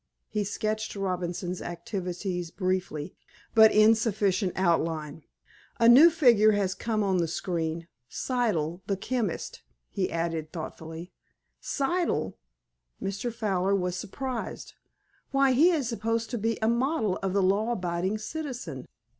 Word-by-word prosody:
He 210 -1 -1
sketched 215 +2 -3
Robinson's 180 -2 -3
activities 180 0 -4
briefly, 185 -4 -2 0.4
but 220 -1 +8
in 215 +1 +6
sufficient 205 -4 0
outline. 160 -4 0 0.6
"A 230 - +5
new 270 +8 +9
figure 235 -10 +5
has 195 -2 0
come 215 0 -1
on 190 -2 +1
the 170 -2 +1
screen—Siddle, 170 - -2
the 195 - 0
chemist," 240 +3 -3 0.3
he 195 -3 -1
added 165 -2 -2
thoughtfully. 165 +1 -7 0.5
"Siddle!" 285 - -1 0.7
Mr. 200 +5 -3
Fowler 200 -4 0
was 180 -2 -1
surprised. 240 +6 -5 0.6
"Why, 275 -1 +3
he 295 +8 +5
is 295 -9 0
supposed 230 0 -2
to 240 - -2
be 225 +1 0
a - - +3
model 235 - +1
of 195 -1 -2
the 200 -1 +2
law 205 +5 +2
abiding 180 +1 -1
citizen." 240 - -6
195 Hz, 125 wpm, -28 LUFS, 175-230 Hz, 0.7 s, new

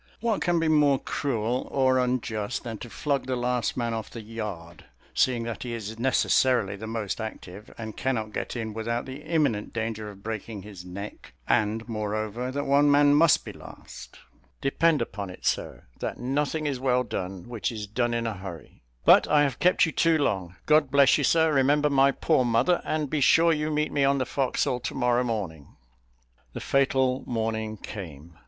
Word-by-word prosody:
What 225 -2 0
can 175 -1 +2
be 165 - +1
more 150 -3 +4
cruel 125 -3 -2
or 130 -1 +2
unjust 120 -3 -2
than 115 -3 -6
to 120 - -8
flog 140 0 -2
the 130 - 0
last 125 -1 -1
man 120 -2 -1
off 110 -1 -4
the 115 - -8
yard? 105 -7 -7 0.3
seeing 120 -3 +2
that 115 -1 -5
he 120 -2 -4
is 110 0 -6
necessarily 125 -4 +2
the 110 +2 -8
most 110 -1 -3
active, 105 -2 -8
and 110 -2 -7
cannot 110 -5 -2
get - - -4
in 110 -2 -4
without 115 +2 -2
the 135 +2 -8
imminent 150 -10 0
danger 110 -2 -3
of 100 -1 -13
breaking 110 -2 -5
his 100 -3 -10
neck; 90 -8 -9
and, 110 +2 +1
moreover, 110 +2 -3
that 145 +2 -3
one 140 +1 +4
man 145 0 +5
must 155 +1 +4
be - - -6
last. - - -12 0.4
Depend 150 0 +2
upon 100 -3 -6
it, 90 - -11
sir, - - -1 0.2
'that - - -4
nothing 145 +4 -1
is 140 -3 -1
well 125 -1 +2
done 95 -4 -5
which 120 -2 -3
is 110 -2 -5
done 120 +3 -1
in 115 0 -1
a 115 - -1
hurry.' 90 -4 -10 0.2
But - - +7
I 150 -1 +4
have 135 -5 -1
kept 180 0 +4
you 160 - -3
too 165 0 +3
long. 95 - -1
God 150 -2 +4
bless 140 +1 +5
you, - - 0
sir; 160 +2 +3
remember 145 +2 +3
my 135 0 +5
poor 130 -1 +2
mother, 120 +9 +2
and 155 -1 -1
be 150 +1 -1
sure 165 +4 +5
you 155 0 -1
meet 150 0 0
me 140 - +1
on 140 0 +3
the 130 - 0
forecastle 130 -1 0
to 125 - -5
morrow 125 -1 +2
morning." 95 - -4 0.8
The - - -5
fatal 130 -1 +1
morning 110 -2 -2
came. 85 -7 -9
120 Hz, 190 wpm, -26 LUFS, 110-140 Hz, 0.8 s, But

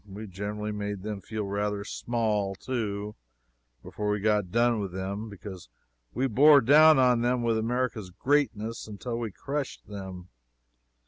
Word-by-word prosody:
We 105 +3 -7
generally 105 +2 -4
made 105 -2 -4
them 105 -2 -4
feel 110 +1 -4
rather 100 +1 -2
small, 105 -3 -1
too, 105 -3 -3 0.7
before 105 -1 -4
we 105 0 +1
got 105 -2 +1
done 120 0 +3
with 100 -3 -4
them, 100 +4 -4
because 95 - -10 0.4
we 130 - -1
bore 140 +4 +7
down 155 +5 +7
on 125 -2 +4
them 120 0 +1
with 115 -1 +1
America's 115 -3 -1
greatness 115 0 0
until 115 +3 -5
we 115 -2 -3
crushed 140 +7 -5
them. 95 -3 -8
105 Hz, 145 wpm, -28 LUFS, 100-120 Hz, 0.7 s, bore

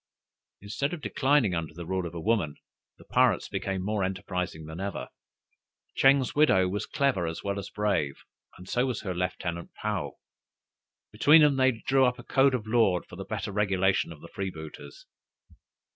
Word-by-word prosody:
Instead 115 - -3
of 160 - -12
declining 135 -8 +2
under 80 -2 -3
the 85 0 -7
rule 95 0 -2
of 85 - -10
a - - -4
woman, 95 -6 0 0.4
the - - -17
pirates - - +2
became 95 -1 -3
more 105 -1 0
enterprising 90 -3 -3
than 80 +2 -8
ever. 95 -9 -4 0.8
Ching's 135 -1 +4
widow 145 -11 +4
was 100 +3 -3
clever 130 -12 +1
as 80 - -5
well 100 0 -2
as 100 - -7
brave, 100 -10 -1 0.3
and 90 - -12
so 125 +6 +1
was 125 -4 -3
her 95 -3 -3
lieutenant 90 -1 -3
Paou. 100 -10 -2 1.0
Between 150 +9 +6
them 145 -2 +4
they 130 0 +5 0.2
drew 135 0 +4
up 125 -1 +2
a 120 - -10
code 135 0 +3
of 115 -4 -4
law 110 -6 +3
for - - -11
the - - -6
better - - -4
regulation 95 -3 +1
of 75 -2 -11
the - - -10
freebooters. 95 - -7
100 Hz, 175 wpm, -28 LUFS, 90-125 Hz, 1.0 s, Between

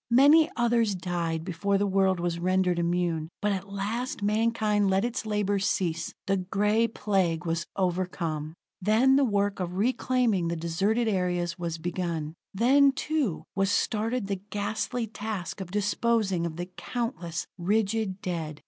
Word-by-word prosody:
Many 290 +6 +6
others 235 -4 +2
died 170 -3 -2
before 195 +3 0
the 200 - +1
world 190 -2 +2
was 170 -1 -1
rendered 185 0 +1
immune, 170 -2 0
but 210 -1 +1
at 195 0 -4
last 215 +4 -3
mankind 210 -1 +2
let 190 +3 +2
its 240 -2 -3
labors 205 -1 0
cease. 170 -5 -1
The 195 0 +1
Gray 210 +5 +1
Plague 185 -6 0
was 165 0 -1
overcome. 170 -4 -2 0.3
Then 225 +7 +4
the 280 - +4
work 205 -4 +1
of 180 -1 -3
reclaiming 240 -4 +1
the 170 - -1
deserted 195 +8 0
areas 180 -4 0
was 170 -1 -3
begun; 170 -2 -3 0.2
then, 270 +6 +4
too, 290 - -1
was 195 0 +2
started 225 +3 0
the 195 -2 -3
ghastly 215 +3 -2
task 205 -3 -5
of 185 - -6
disposing 205 -2 +1
of 160 - -7
the 175 +1 -4
countless, 180 -3 -4
rigid 205 +1 0
dead. 160 -4 -3
195 Hz, 150 wpm, -27 LUFS, 175-220 Hz, 0.3 s, Many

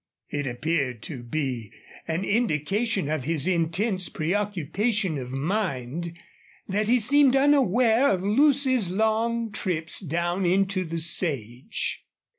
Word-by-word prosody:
It 145 -1 -2
appeared 125 -2 -2
to 135 -7 -7
be 125 -4 -3 0.4
an 165 +4 -2
indication 205 -1 0
of 150 -4 -2
his 160 -2 +1
intense 185 +3 0
preoccupation 195 - -1
of 125 -1 -7
mind 165 - -3 0.5
that 210 +2 -1
he 245 +2 +4
seemed 270 +3 +5
unaware 260 -3 +4
of 185 -2 0
Lucy's 260 - +3
long 220 +3 0
trips 170 -6 -2
down 175 +2 -2
into 190 +1 +1
the 165 0 -4
sage. 145 - -1
185 Hz, 115 wpm, -25 LUFS, 155-220 Hz, 0.5 s, seemed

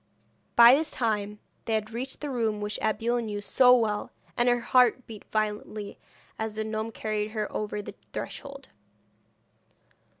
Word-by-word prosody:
By 235 +1 +9
this 305 +3 +2
time 210 -3 -1 0.3
they 225 - 0
had 215 0 -2
reached 255 +4 -5
the 295 -2 -3
room 225 -4 0
which 210 +1 -3
Abeille 225 +3 0
knew 210 -2 -4
so 250 +4 +5
well, 215 -4 0 0.3
and 240 +1 +3
her 245 0 +3
heart 250 0 +3
beat 215 -3 -10
violently 210 -1 -3 0.4
as 220 -1 -3
the 220 - -2
gnome 220 +1 -3
carried 215 -1 -2
her 215 -2 -1
over 210 -1 -3
the - - -8 0.2
threshold. 275 -1 -7
220 Hz, 155 wpm, -27 LUFS, 210-245 Hz, 0.4 s, By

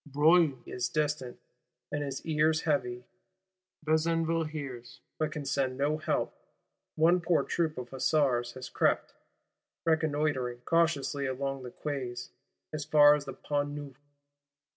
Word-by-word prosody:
Broglie 150 +1 +4
is 120 -1 -3
distant, 150 -5 -1 0.5
and 145 0 -1
his 135 -1 -5
ears 155 0 +2
heavy: 125 -5 -1 0.8
Besenval 165 +1 +1
hears, 135 -6 -7 0.2
but 155 -1 0
can 150 -1 -5
send 135 -2 0
no 150 +3 +1
help. 155 - -1 0.6
One 170 +3 +4
poor 170 -1 +2
troop 160 -3 -1
of 125 -1 -6
Hussars 130 -3 +1
has 130 -1 -7
crept, - - +1 0.7
reconnoitring, 150 -6 0
cautiously 160 -4 +1
along 135 +1 -3
the 125 - -7
Quais, 130 -3 -5 0.4
as 155 -1 -3
far 150 -1 +7
as 150 -1 -1
the - - -6
Pont 145 -1 -2
Neuf. 145 -2 -9
145 Hz, 130 wpm, -30 LUFS, 130-155 Hz, 0.8 s, far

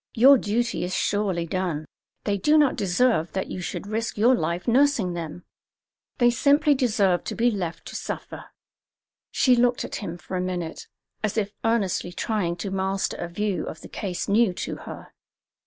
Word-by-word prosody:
Your 265 +3 +7
duty 230 +3 -1
is 180 +1 -2
surely 195 -5 0
done. 170 -3 -2 0.4
They 205 - 0
do 295 +11 +3
not 295 -3 +4
deserve 190 -2 +1
that 190 - -3
you 185 - -4
should 180 - -5
risk 220 +2 -3
your 235 +5 +5
life 170 -3 -1
nursing 245 -7 +3
them; 170 0 -6 0.7
they 240 -1 +5
simply 290 +5 +4
deserve 210 - +2
to - - -4
be 240 +2 +3
left 180 -6 -4
to - - -9
suffer." - - -6 0.8
She 255 -2 +4
looked 245 0 +2
at - - -5
him 175 -5 -5
for 175 +2 -7
a 180 - 0
minute, 180 -3 -4 0.3
as 215 0 -2
if 205 -2 0
earnestly 205 -6 0
trying 185 -3 -1
to 190 +2 -5
master 190 0 -1
a 175 - -4
view 195 -1 -2
of 160 - -7
the - - -10
case 185 -4 -4
new 205 -1 +3
to - - -4
her. - - -9
200 Hz, 175 wpm, -25 LUFS, 180-235 Hz, 0.8 s, Your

